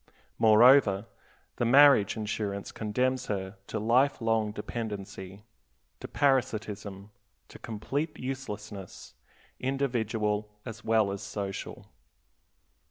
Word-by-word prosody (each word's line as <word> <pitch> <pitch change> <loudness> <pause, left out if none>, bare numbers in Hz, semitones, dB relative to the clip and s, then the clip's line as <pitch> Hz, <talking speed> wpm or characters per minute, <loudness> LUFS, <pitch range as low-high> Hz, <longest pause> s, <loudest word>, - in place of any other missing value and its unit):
Moreover, 110 -2 +6 0.5
the - - 0
marriage 135 -5 +6
insurance 105 -2 -3
condemns 125 +4 -1
her 95 -1 -4
to - - -4
life 125 +7 +2
long 115 -2 0
dependency, 105 -3 -6 0.6
to - - -7
parasitism, 110 -7 -1 0.4
to - - -13
complete 140 +8 -4
uselessness, 105 -7 -7 0.5
individual 110 -6 -1
as 115 -2 -8
well 110 -3 +2
as 100 - -5
social. 100 -2 -6
110 Hz, 95 wpm, -29 LUFS, 105-125 Hz, 0.6 s, Moreover